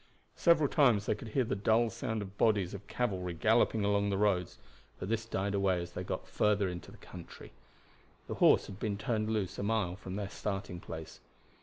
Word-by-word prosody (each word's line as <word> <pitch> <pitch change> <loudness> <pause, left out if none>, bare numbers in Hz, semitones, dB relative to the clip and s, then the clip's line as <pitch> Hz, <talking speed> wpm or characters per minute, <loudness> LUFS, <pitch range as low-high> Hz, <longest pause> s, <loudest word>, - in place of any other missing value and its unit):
Several 170 -4 +4
times 125 -9 +3
they - - +2
could 105 +2 -8
hear 125 +4 +1
the 110 - -2
dull 110 +3 +2
sound 110 -2 -3
of 95 0 -10
bodies 100 -4 +2
of 100 0 -8
cavalry 95 -7 -2
galloping 110 +3 +3
along 100 0 +2
the 100 - 0
roads; 95 -3 +1 0.4
but 95 - -5
this 115 0 -1
died 100 -2 -1
away 100 -2 +2
as 85 0 -6
they - - -5
got - - -4
further 105 -2 +2
into 90 -1 -6
the - - -13
country. 90 -2 -11 0.7
The - - -5
horse - - +6
had 100 - -9
been 105 -2 -2
turned 110 0 -1
loose 100 -5 -2
a - - -1
mile 100 -4 0
from 95 -1 -7
their 100 -1 -3
starting 100 -3 -4
place. 80 -2 -8
100 Hz, 200 wpm, -32 LUFS, 95-110 Hz, 0.7 s, horse